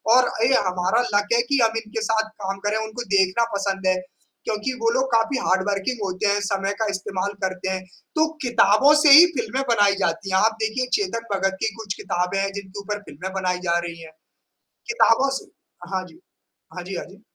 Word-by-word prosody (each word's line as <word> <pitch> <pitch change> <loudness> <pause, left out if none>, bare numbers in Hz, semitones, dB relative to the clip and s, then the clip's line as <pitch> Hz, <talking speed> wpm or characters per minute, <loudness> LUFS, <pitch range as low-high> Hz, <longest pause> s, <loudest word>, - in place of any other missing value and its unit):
और 255 -1 +4 0.2
ये 265 - +3
हमारा 180 +6 +1
लक 205 0 +2
है 235 - +4
कि 280 - +3
हम 225 0 +1
इनके 220 +1 -5
साथ 220 0 0
काम 195 +1 -3
करें, 210 +1 +1
उनको 225 +3 -6
देखना 190 +4 +3
पसंद 195 -1 -2
है, 185 - +4 0.5
क्योंकि 220 +4 -2
वो 230 - +3
लोग 265 - +1
काफ़ी 230 +4 +2
हार्ड 190 +1 +2
वर्किंग 205 +5 -2
होते 190 +2 -1
हैं, 200 0 +2
समय 195 0 -1
का 220 - +1
इस्तेमाल 195 0 -3
करते 190 0 -2
हैं, 185 0 -3 0.3
तो 315 0 +3
किताबों 240 +2 +4
से 295 - +7
ही 315 +5 +11
फ़िल्में 240 +3 -2
बनाई 205 -3 +4
जाती 195 +4 -2
हैं। 190 - +3
आप 220 +3 +2
देखिए 250 +4 -1
चेतन 230 - -3
भगत 195 0 -1
की 220 - -1
कुछ 220 -4 -5
किताबें 180 +2 -1
हैं 195 0 -1
जिनके 200 0 -8
ऊपर 210 +1 -4
फ़िल्में 180 +6 -7
बनाई 185 -2 -1
जा 170 - +3
रही 170 0 -9
हैं। 160 -1 -11 0.8
किताबों 275 - +3
से - - -17 0.4
हाँ 185 -1 -1
जी। 325 - -18 0.6
हाँ 180 - -6
जी, 185 +1 -6
हाँ - - -5
जी। 200 +2 -17
205 Hz, 205 wpm, -23 LUFS, 190-230 Hz, 0.8 s, ही